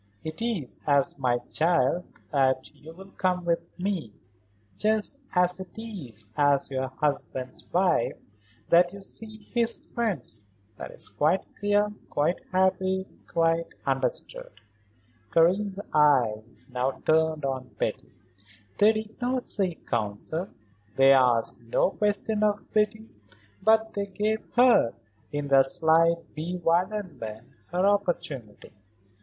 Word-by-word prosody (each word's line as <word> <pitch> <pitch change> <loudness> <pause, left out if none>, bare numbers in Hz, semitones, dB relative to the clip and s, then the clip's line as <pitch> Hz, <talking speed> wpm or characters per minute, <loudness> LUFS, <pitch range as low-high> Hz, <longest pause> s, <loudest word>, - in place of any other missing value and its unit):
It 160 +6 -6
is 220 - -2
as 140 -1 +2
my 125 -2 +2
child 160 +4 +1 0.3
that 130 -3 +1
you 160 - -12
will 190 +3 -13
come 180 -2 -1
with 170 -1 +2 0.2
me; 180 - -2 0.6
just 220 +5 +1 0.2
as 180 0 +3
it 190 +2 -10
is 145 - -6
as 145 -1 +2
your 130 0 -1
husband's 130 -2 -3
wife 175 -7 +2 0.5
that 175 +1 +5
you 200 -1 -10
see 215 +2 -8
his 235 -1 -1
friends. 165 - -2 0.3
That - - -7
is - - -5
quite 150 - +1
clear, 205 +1 +2 0.2
quite 150 +5 0
happy, 190 0 +1 0.2
quite 165 0 +1 0.2
understood." 135 -2 -2 0.8
Karen's 190 +4 +3
eyes 120 -7 +2
now 125 +2 0
turned 160 -2 +2
on 130 -1 -3
Betty. - - -3 0.7
They 215 +2 +6
did 220 +2 -6
not 250 +1 0
seek 185 -5 -1
counsel, 110 - -2 0.5
they 135 0 +7
asked 120 -3 +3
no 120 +10 +1
question 210 +1 0
of 210 -1 0
Betty; 215 +1 +1 0.5
but 220 +2 +3
they 200 0 -2
gave 210 +3 -1
her, 240 - +5 0.4
in 145 0 -2
their 135 -1 +7
slight 165 +4 +2
bewilderment, 165 - -2 0.2
her 180 +3 0
opportunity. 160 - -1
170 Hz, 120 wpm, -27 LUFS, 135-205 Hz, 0.8 s, they